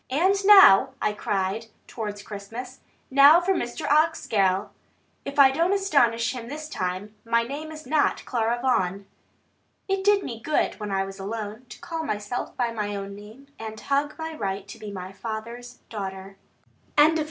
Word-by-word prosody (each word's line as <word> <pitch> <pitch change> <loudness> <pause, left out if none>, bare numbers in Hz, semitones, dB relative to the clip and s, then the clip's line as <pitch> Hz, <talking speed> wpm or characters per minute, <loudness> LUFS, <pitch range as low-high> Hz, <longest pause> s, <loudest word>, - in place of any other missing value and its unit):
"And 335 +9 +3
now," 270 - +8
I 210 - 0
cried 205 +2 -2 0.2
towards 210 -3 -6
Christmas, 225 +6 -8 0.3
"now 280 +5 +8
for 365 +2 +1
Mr. 240 -9 -3
Oxgall; 215 - +2 0.6
if 280 +1 -6
I 275 -2 +8
don't 335 +7 +1
astonish 240 -14 +2
him 240 -2 -7
this 305 +2 -6
time, 185 -4 -4
my 230 0 +2
name 290 +6 -6
is 310 -1 -10
not 295 +3 +1
Clara 235 -1 0
Vaughan!" 200 -6 0 0.8
It 390 -1 -1
did 410 0 +4
me 230 -2 -6
good 300 -1 0
when 210 -1 -5
I 195 -1 0
was 195 0 -9
alone, 215 +4 -6
to - - -11
call 325 -1 -4
myself 210 -4 -4
by 240 -2 0
my 210 -2 -3
own 200 0 -6
name, 220 +7 -14
and 220 -1 -7 0.4
my 320 0 -5
right 195 -4 -4
to - - -10
be 210 -1 -7
my 185 -1 -7
father's 235 +4 -7
daughter. 195 -2 -6 0.6
CHAPTER 310 +2 +6
XIV. - - -1
230 Hz, 165 wpm, -25 LUFS, 205-290 Hz, 0.8 s, now